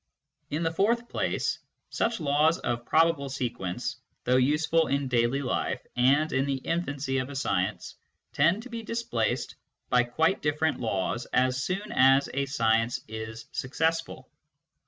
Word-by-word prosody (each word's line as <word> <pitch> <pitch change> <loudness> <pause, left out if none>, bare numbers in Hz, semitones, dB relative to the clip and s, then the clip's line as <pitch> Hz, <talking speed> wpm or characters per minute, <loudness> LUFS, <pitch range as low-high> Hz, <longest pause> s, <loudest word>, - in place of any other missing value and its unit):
In 155 +3 -2
the 165 - +1
fourth 235 +7 +1
place, - - -1 0.3
such 230 -2 0
laws 155 +2 +3
of 120 -5 -3
probable 160 -3 +3
sequence, 120 -9 -3 0.3
though 125 +1 +3
useful 155 +5 +2
in 140 0 0
daily 125 +2 +1
life 125 0 -2
and 140 +6 +3
in 135 +1 +1
the 140 - 0
infancy 135 -3 -2
of 130 +1 -3
a 140 - -7
science, 100 -6 -1 0.4
tend 190 +6 +3
to 255 - -10
be 230 -1 -5
displaced 220 - -2 0.4
by 125 -1 +4
quite 160 +9 +1
different 150 +1 0
laws 110 +1 -2
as 130 +1 +2
soon 200 +3 -3
as 135 +2 +5
a 140 +1 -1
science 115 -2 +1
is 110 +1 -7
successful. 160 +5 -2
140 Hz, 145 wpm, -28 LUFS, 125-160 Hz, 0.4 s, as